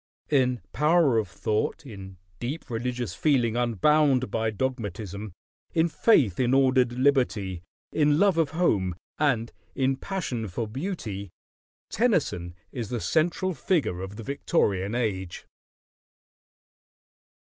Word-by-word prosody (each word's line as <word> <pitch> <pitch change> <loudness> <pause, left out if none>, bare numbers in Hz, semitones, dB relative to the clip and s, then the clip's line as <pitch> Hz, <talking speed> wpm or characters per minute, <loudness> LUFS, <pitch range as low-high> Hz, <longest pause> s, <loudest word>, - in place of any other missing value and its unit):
In 125 -4 +2
power 150 -4 +4
of 105 - -2
thought, 105 - -2
in 95 -6 -10 0.2
deep 130 +2 -5
religious 120 -3 -2
feeling 120 -2 +2
unbound 130 +2 +2
by 110 +1 0
dogmatism, 105 -4 -4 0.4
in 165 +1 +3
faith 145 - +3
in 125 0 +3
ordered 130 -2 +3
liberty, 120 - +1 0.3
in 150 -1 +3
love 195 -2 +3
of 160 -3 +2
home, 105 - +1 0.2
and 120 -6 +1 0.2
in 135 0 +1
passion 130 - -3
for 110 +5 -3
beauty, 110 - -5 0.6
Tennyson 145 - 0 0.2
is 115 -5 -5
the 120 - -2
central 175 - +1
figure 150 - 0
of 95 +2 -6
the 115 - -8
Victorian 105 - 0
Age. 95 -7 -2
125 Hz, 115 wpm, -26 LUFS, 105-150 Hz, 0.6 s, power